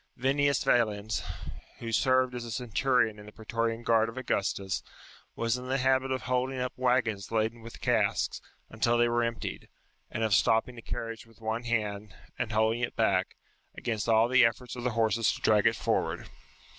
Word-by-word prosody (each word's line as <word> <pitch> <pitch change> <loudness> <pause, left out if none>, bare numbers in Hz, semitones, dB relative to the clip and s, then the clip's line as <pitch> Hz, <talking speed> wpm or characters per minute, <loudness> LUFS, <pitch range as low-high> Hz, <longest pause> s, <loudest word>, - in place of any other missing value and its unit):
Vinnius 140 +2 +2
Yalens, 110 -2 +1 0.6
who 115 -1 -5
served 130 +2 +3
as 120 -1 -4
a 120 - -7
centurion 120 -1 +1
in 105 - -12
the - - -10
praetorian 115 +1 -2
guard 115 -1 +3
of 115 - -10
Augustus, 100 -5 -1 0.5
was 115 +1 0
in 125 - -8
the 135 +1 +1
habit 130 0 +2
of 130 - -2
holding 130 +1 0
up 125 0 -2
waggons 125 -6 0
laden 115 +1 0
with 115 +1 -11
casks, - - +1 0.3
until 115 +2 +1
they 120 0 +4
were 120 0 +1
emptied; 115 0 -4 0.4
and 115 - -3
of 110 -2 +1
stopping 110 +5 +3
a - - -9
carriage 115 0 -6
with 115 - -21
one 115 +2 -3
hand, 105 -3 -2 0.2
and 125 -3 -1
holding 110 +2 +2
it 125 - -2
back, 95 -5 +1 0.4
against 115 -1 -2
all 115 +1 +5
the 130 0 +5
efforts 115 +1 0
of 125 - -6
the 125 - +1
horses 115 0 +3
to - - -7
drag 105 -1 +4
it 110 - +3
forward. - - -1
115 Hz, 180 wpm, -29 LUFS, 110-125 Hz, 0.6 s, all